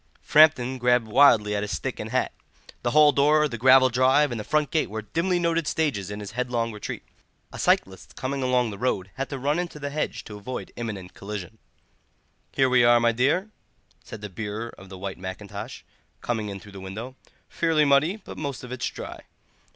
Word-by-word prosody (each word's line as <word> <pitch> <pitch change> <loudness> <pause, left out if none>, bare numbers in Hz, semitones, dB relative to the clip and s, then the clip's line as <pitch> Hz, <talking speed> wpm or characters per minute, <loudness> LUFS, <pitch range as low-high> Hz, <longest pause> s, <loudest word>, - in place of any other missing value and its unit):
Framton 130 -4 +5
grabbed 125 -1 +3
wildly 110 -3 +5
at 100 - -1
his 105 -3 -3
stick 80 - -4
and - - -5
hat; - - 0 0.5
the 120 - 0
hall 150 +3 +6
door, 150 +2 +4
the 125 - -6
gravel 130 +2 +6
drive, 130 +4 +3
and 120 - -3
the - - -4
front 150 +5 0
gate 160 -3 +1
were 110 +1 -5
dimly 170 - 0
noted 170 -2 0
stages 125 - -1
in 105 +1 -6
his 100 - -7
headlong 120 -1 -1
retreat. 105 -1 -6 0.5
A - - -8
cyclist 95 0 0
coming 135 +2 -3
along 125 -3 +1
the 100 - -9
road 100 -6 -1
had 135 +1 -4
to 140 - -4
run 145 +5 0
into 175 -3 -4
the 145 -1 -5
hedge 150 +1 -3
to 105 - -9
avoid 125 +5 -6
an - - -23
imminent 100 -6 -6
collision. 105 +2 -7 0.9
"Here 135 -1 +3
we 125 -1 +4
are, 120 0 +6
my 115 0 +3
dear," 145 - +1 0.5
said 110 - -10
the 105 - -6
bearer 105 +4 -5
of 95 0 -14
the 95 - -9
white 95 0 -6
mackintosh, 95 +2 -7 0.4
coming 110 -3 -2
in 100 -1 -6
through 105 - -14
the 100 - -10
window; 110 +7 -7 0.3
"fairly 160 -3 +2
muddy, 140 +6 +3
but 220 - -10
most 140 -3 -4
of 125 - -9
it's 125 -1 -2
dry. - - -8
125 Hz, 205 wpm, -25 LUFS, 105-145 Hz, 0.9 s, hall